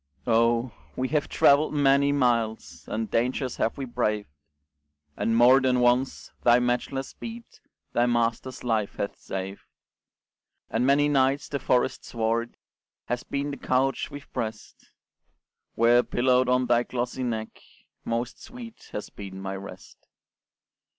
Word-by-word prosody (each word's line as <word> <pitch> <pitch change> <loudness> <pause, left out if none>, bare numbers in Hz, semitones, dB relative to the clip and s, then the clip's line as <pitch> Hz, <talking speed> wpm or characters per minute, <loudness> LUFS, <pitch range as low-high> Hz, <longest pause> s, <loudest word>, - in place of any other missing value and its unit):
Oh! 115 +1 +2 0.2
we 130 0 -1
have 150 -2 0
travelled 145 +2 +4
many 140 0 +4
miles, 120 -5 0
And 110 0 -3
dangers 125 +2 0
have 115 - 0
we 135 - -3
braved; 105 - -1 0.8
And 115 0 0
more 125 +3 +7
than 125 -1 +2
once 125 +2 +1
thy 120 0 +6
matchless 125 +2 -1
speed 230 0 -8 0.5
Thy 120 +1 +3
master's 120 +2 -1
life 110 -4 0
hath 100 - -3
saved; 95 +1 -5 1.1
And 120 +3 +1
many 145 +1 +4
nights 135 -1 +2
the 140 - -2
forest 125 -2 +1
sward 115 0 -2 0.5
Has 120 0 -1
been 140 +1 -3
the 140 - -6
couch 130 +1 0
we've 145 -2 -11
pressed, 110 -4 -6 0.9
Where, 120 +1 +5
pillowed 125 +1 +2
on 125 0 +3
thy 120 -1 +3
glossy 120 +1 -3
neck, 110 -3 -4 0.4
Most 115 +1 -3
sweet 240 -3 -11
has 105 - -5
been 95 -1 -8
my 95 0 -4
rest. 100 +1 -11
125 Hz, 135 wpm, -26 LUFS, 115-135 Hz, 1.1 s, more